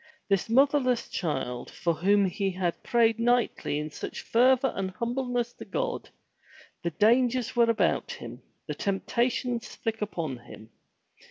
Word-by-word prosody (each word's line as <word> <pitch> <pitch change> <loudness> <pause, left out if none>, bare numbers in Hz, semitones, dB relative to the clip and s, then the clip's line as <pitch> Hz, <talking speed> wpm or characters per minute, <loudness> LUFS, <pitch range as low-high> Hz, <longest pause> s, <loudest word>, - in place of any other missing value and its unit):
This 195 +1 +1
motherless 260 0 +3
child, 125 -7 -3
for 170 -1 -1
whom 200 +5 +3
he 195 +2 -1
had 180 -2 -2
prayed 230 -1 +2
nightly 240 -10 +1
in 150 +1 -4
such - - -6
a - - -27
fervor 255 +2 +4
and 195 -1 -2
humbleness 240 +3 -2
to - - -10
God, - - -3 0.7
the 170 - -1
dangers 240 +7 +2
were 235 -1 +4
about 230 - +1
him, - - -9 0.2
the - - -3
temptations 235 +4 -1
thick 225 -1 -3
upon 165 -10 -3
him. 110 -1 -13
230 Hz, 145 wpm, -28 LUFS, 185-245 Hz, 0.7 s, fervor